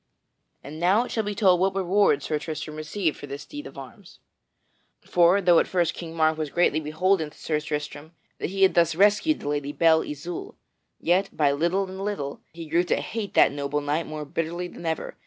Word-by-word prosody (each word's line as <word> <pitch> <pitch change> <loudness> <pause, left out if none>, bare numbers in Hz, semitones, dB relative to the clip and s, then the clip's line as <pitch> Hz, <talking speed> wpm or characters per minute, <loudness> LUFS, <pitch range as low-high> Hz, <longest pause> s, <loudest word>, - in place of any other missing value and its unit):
And 150 +3 -9
now 190 +7 +3
it - - -8
shall 220 - 0
be 205 0 -4
told 185 -5 +4
what 190 +1 +1
reward 190 -6 +2
Sir 155 -1 -1
Tristram 155 0 -6
received 155 +2 -2
for 145 - -9
this 140 +1 -7
deed 295 0 -8
of - - -13
arms. - - -12 0.8
For, 175 +2 +4
though 175 -3 +5
at - - +1
first 175 -3 +1
King 165 -1 -8
Mark 160 -1 +2
was 155 -2 -2
greatly 165 -1 +2
beholden 160 +2 0
to - - -21
Sir 155 -2 -1
Tristram, 150 +1 -5 0.3
that - - -2
he 195 +1 0
had 190 - +5
thus 170 -2 +3
rescued 210 - +3
the - - -6
Lady 145 -1 -2
Belle 160 0 +4
Isoult, 165 +4 -6 0.4
yet, 185 +4 +1
by 145 -2 +2
little 175 +7 0
and 190 +1 -7
little, 170 -9 -4
he 165 0 -9
grew 165 +3 +2
to - - +1
hate 220 -4 -5
that - - +6
noble 140 +1 -2
knight 145 +3 -2
more 155 -1 -6
bitterly 165 +3 -3
than 170 -1 -8
ever. 160 -1 -3
165 Hz, 210 wpm, -25 LUFS, 150-190 Hz, 0.8 s, that